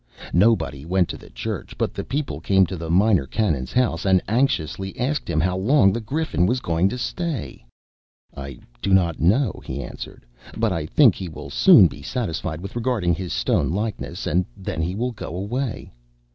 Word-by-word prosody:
Nobody 85 - +2
went 90 +2 +1
to - - -5
the - - -14
church, 60 0 -6
but - - -1
the - - -4
people 145 +1 -3
came 95 -1 +4
to 90 +2 -5
the 80 -1 -6
Minor 95 -4 +3
Canon's 80 - -1
house, 120 -10 +1
and 95 -1 +4
anxiously 95 - -1
asked 140 +4 -1
him 80 - +1
how 90 +3 +1
long 95 +1 +4
the 115 - -2
Griffin 135 - 0
was 125 +4 +1
going 85 -3 +1
to 125 - -4
stay. 160 +1 -4 0.7
"I 70 -2 -7 0.2
do 95 - +3
not 85 -4 +1
know," 105 - +2
he 70 - -5
answered, - - -9 0.3
"but 110 -1 +1
I 80 -4 -2
think 125 - +5
he 95 -1 -6
will 80 - -9
soon - - +7
be 70 - -3
satisfied 85 - -3
with 95 +4 -8
regarding 115 -7 0
his 90 +2 -4
stone 60 -2 +1
likeness, 105 +5 -3
and 90 +3 +2
then 80 - -4
he 90 +3 -2
will 125 +4 -1
go 105 -7 -7
away." 115 +6 -4
95 Hz, 185 wpm, -23 LUFS, 80-115 Hz, 0.7 s, soon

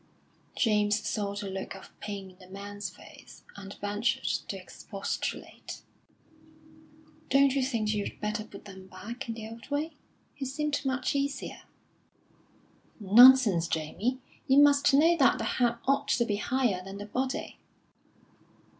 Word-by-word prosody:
James 210 -2 +2
saw 200 -2 -2
the 205 0 -4
look 190 0 -5
of 195 - -12
pain 200 -2 -6
in 185 - -23
the 185 - -15
man's 205 +2 -6
face, - - -15
and 200 0 -9
ventured 205 +3 -1
to - - -2
expostulate. - - -6 1.5
"Don't 275 0 +5
you 275 - +1
think 225 -5 0
you'd 205 -1 -4
better 210 0 -2
put 205 -2 -13
them 190 -2 -11
back 230 +7 -8
in 225 - -3
the 220 -1 -7
old 230 +3 -11
way? 295 +3 -2 0.4
He - - -7
seemed 295 +3 -2
much 260 -1 0
easier." 280 0 -3 1.4
"Nonsense, 215 -4 +7
Jamie. 180 +11 -2 0.3
You 265 - +4
must 285 0 +5
know 320 +5 +5
that 270 -4 +4
the - - -3
head 240 -2 +1
ought 275 +1 +1
to 240 -3 +2
be 205 -3 -1
higher 225 -4 0
than 195 +1 -8
the 205 - -6
body." 260 +5 -3
220 Hz, 145 wpm, -29 LUFS, 200-265 Hz, 1.5 s, Nonsense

